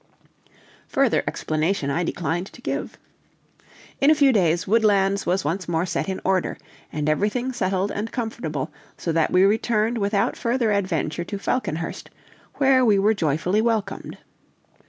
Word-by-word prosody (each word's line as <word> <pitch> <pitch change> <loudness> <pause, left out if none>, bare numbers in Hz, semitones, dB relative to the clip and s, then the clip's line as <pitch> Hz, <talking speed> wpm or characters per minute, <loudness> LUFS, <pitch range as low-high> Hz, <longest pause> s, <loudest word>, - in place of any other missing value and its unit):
Further - - +2
explanation 155 -1 -1
I 170 +5 0
declined 175 +2 -2
to - - -14
give. - - -3 1.0
In 275 - +4
a 310 - +6
few 280 -3 +4
days 175 -5 +2
Woodlands 200 -2 +2
was 180 0 +1
once 170 +4 -2
more 165 +1 +1
set 190 - -2
in 190 - -3
order, 190 -1 +1 0.3
and 150 -1 -2
everything 210 +11 0
settled 190 -2 -1
and 215 +2 -4
comfortable, 190 - -4 0.3
so 170 - -2
that 160 -1 +2
we 180 +1 +4
returned 220 +2 +2
without 200 0 +1
further 235 -2 0
adventure 175 -5 -1
to 200 - -5
Falconhurst, 170 -6 -3 0.5
where 265 -2 +4
we 215 -4 +4
were 205 +3 +3
joyfully 175 +3 0
welcomed. 220 -4 -2
195 Hz, 145 wpm, -23 LUFS, 170-220 Hz, 1.0 s, a